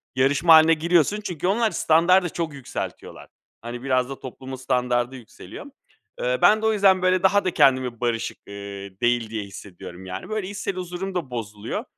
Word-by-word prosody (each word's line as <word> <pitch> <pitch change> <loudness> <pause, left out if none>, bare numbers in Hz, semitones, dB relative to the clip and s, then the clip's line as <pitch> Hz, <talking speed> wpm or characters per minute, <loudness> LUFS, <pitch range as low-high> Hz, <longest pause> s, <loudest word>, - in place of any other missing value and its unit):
yarışma 145 +6 +4
hâline 160 +1 +6
giriyorsun. 170 +5 +2
Çünkü 180 -1 -3
onlar 220 +2 +2
standardı 175 +3 +3
çok 165 -2 -4
yükseltiyorlar. 135 -3 -7 0.3
Hani, 120 +2 -7
biraz 130 -1 +1
da 135 - -7
toplumun 130 +1 -8
standardı 125 -1 -1
yükseliyor. 125 - -11 0.6
Eee, - - 0
ben 215 +1 +5
de - - -2
o 220 - +3
yüzden, 195 -3 +4
böyle, 185 0 +2
daha 200 +1 +3
da 185 - +1
kendimi 130 -5 +2
barışık, 120 -2 -2
ııı, 100 - -9 0.5
değil 120 -2 +1
diye 110 -2 -4
hissediyorum. 95 -2 -11
Yani, 95 - -7
böyle, 215 -3 -3
içsel 200 -1 -4
huzurum 185 +1 -5
da 145 -8 -3
bozuluyor. 105 -2 -5
145 Hz, 170 wpm, -23 LUFS, 120-185 Hz, 0.6 s, hâline